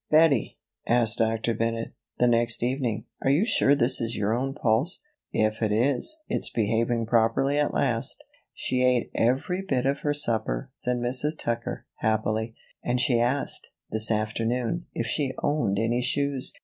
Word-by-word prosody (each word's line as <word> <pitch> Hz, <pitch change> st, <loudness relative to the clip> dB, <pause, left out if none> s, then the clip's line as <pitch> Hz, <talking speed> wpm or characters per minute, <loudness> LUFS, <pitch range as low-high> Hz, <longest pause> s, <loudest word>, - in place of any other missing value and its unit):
"Bettie," 155 Hz, -1 st, +3 dB, 0.3 s
asked 120 Hz, -1 st, +2 dB
Dr. 115 Hz, +1 st, +1 dB
Bennett, 115 Hz, +1 st, -2 dB, 0.2 s
the 125 Hz, -, +3 dB
next 120 Hz, -1 st, +1 dB
evening, 120 Hz, -4 st, -1 dB, 0.2 s
"are -, -, +2 dB
you 150 Hz, +10 st, +3 dB
sure 145 Hz, -, +3 dB
this 125 Hz, -2 st, 0 dB
is 115 Hz, 0 st, -2 dB
your 105 Hz, +1 st, 0 dB
own 135 Hz, +3 st, -2 dB
pulse? 135 Hz, -, 0 dB, 0.3 s
If 110 Hz, +1 st, 0 dB
it 110 Hz, -2 st, +1 dB
is, 130 Hz, -, +2 dB
it's -, -, -1 dB
behaving 115 Hz, +1 st, 0 dB
properly 115 Hz, +5 st, +2 dB
at 145 Hz, -, +1 dB
last." 120 Hz, -4 st, -1 dB, 0.3 s
"She 125 Hz, -, -1 dB
ate 125 Hz, -2 st, +2 dB
every 135 Hz, +10 st, 0 dB
bit 135 Hz, -10 st, -1 dB
of 140 Hz, +1 st, +1 dB
her 145 Hz, 0 st, -1 dB
supper," 110 Hz, -, 0 dB
said 125 Hz, 0 st, -1 dB
Mrs. 125 Hz, +6 st, 0 dB
Tucker, 120 Hz, 0 st, -3 dB
happily, 110 Hz, +1 st, -1 dB, 0.3 s
"and 125 Hz, +1 st, 0 dB
she 125 Hz, -2 st, +3 dB
asked, 125 Hz, +4 st, 0 dB, 0.2 s
this 110 Hz, 0 st, +4 dB
afternoon, 115 Hz, +8 st, -1 dB
if -, -, -1 dB
she 140 Hz, -4 st, -1 dB
owned 135 Hz, -10 st, +1 dB
any 115 Hz, +3 st, +1 dB
shoes. 140 Hz, +1 st, 0 dB
120 Hz, 160 wpm, -26 LUFS, 115-135 Hz, 0.3 s, this